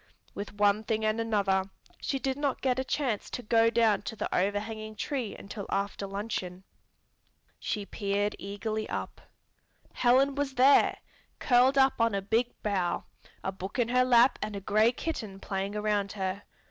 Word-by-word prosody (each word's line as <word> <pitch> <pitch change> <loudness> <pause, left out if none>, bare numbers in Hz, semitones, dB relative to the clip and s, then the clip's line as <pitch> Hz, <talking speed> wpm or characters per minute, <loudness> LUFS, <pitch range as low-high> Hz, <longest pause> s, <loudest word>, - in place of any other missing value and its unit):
With 205 +1 -7
one 205 +1 +3
thing 220 -1 -1
and 215 +1 +1
another, 200 -4 +1 0.4
she 275 - -1
did 265 0 -1
not 280 -2 -2
get 260 -1 +1
a - - 0
chance 260 -5 -2
to 250 - -5
go 225 +1 +4
down 225 -3 +3
to 225 - -6
the - - -3
overhanging 215 +3 -2
tree 255 -3 -3
until 200 0 -7
after 200 0 -2
luncheon. 195 -2 -4 1.0
She 210 -2 -3
peered 205 +1 -1
eagerly 215 +2 -4
up. - - -5 0.7
Helen 260 +3 +4
was 280 -1 -2
there, 265 +3 +5 0.4
curled 255 +2 +4
up 265 -3 +4
on 230 -3 +2
a 195 - 0
big 225 +4 +2 0.2
bough, 185 -4 0 0.4
a 190 - -1
book 190 +4 -7
in 240 -2 +1
her 250 +1 +4
lap 245 0 +5
and 215 -1 -3
a - - -3
gray 215 +4 +3
kitten 225 -9 -5
playing 195 +1 -3
around 210 -1 0
her. 190 0 -3
215 Hz, 165 wpm, -29 LUFS, 200-245 Hz, 1.0 s, there